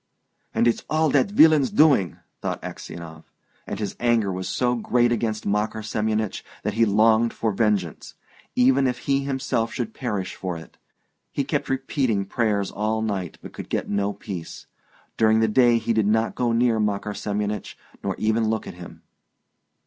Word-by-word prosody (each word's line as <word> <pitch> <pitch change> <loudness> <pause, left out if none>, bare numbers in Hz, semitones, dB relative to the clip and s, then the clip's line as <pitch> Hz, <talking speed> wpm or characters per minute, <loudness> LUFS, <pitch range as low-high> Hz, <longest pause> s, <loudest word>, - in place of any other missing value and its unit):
"And 120 - +2
it's 120 - +1
all 155 -1 +2
that 140 +5 +3
villain's 155 -8 +5
doing!" 140 - +4 0.2
thought - - -2
Aksionov. 80 -1 -8 0.4
And - - -4
his 105 -3 -4
anger 115 -4 +2
was 95 0 -4
so 125 -1 +1
great 120 +1 +2
against 110 -2 -1
Makar 105 +2 -1
Semyonich 110 -1 -1 0.2
that - - -1
he 115 - +3
longed 110 +2 +3
for 110 - -1
vengeance, 100 -5 -1 0.4
even 130 +2 +4
if 125 -1 -1
he 140 0 +1
himself 130 -4 -1
should 225 - -4
perish 105 - -3
for 90 -3 -4
it. 80 - -13 0.5
He 140 - -1
kept 145 +1 -2
repeating 130 -6 0
prayers 100 -1 0
all 110 +2 -1
night, 95 -6 -3
but - - -10
could - - -8
get - - -2
no 100 0 0
peace. 95 -4 -8 0.5
During 110 0 +4
the 110 - +3
day 120 +1 +4
he 115 0 0
did 110 -2 +2
not 110 +2 +2
go 120 -2 0
near 115 -1 +2
Makar 105 0 -1
Semyonich, 105 0 -3 0.3
nor - - -1
even 110 0 +1
look 110 0 -1
at - - -7
him. 90 0 -12
110 Hz, 170 wpm, -24 LUFS, 105-125 Hz, 0.5 s, villain's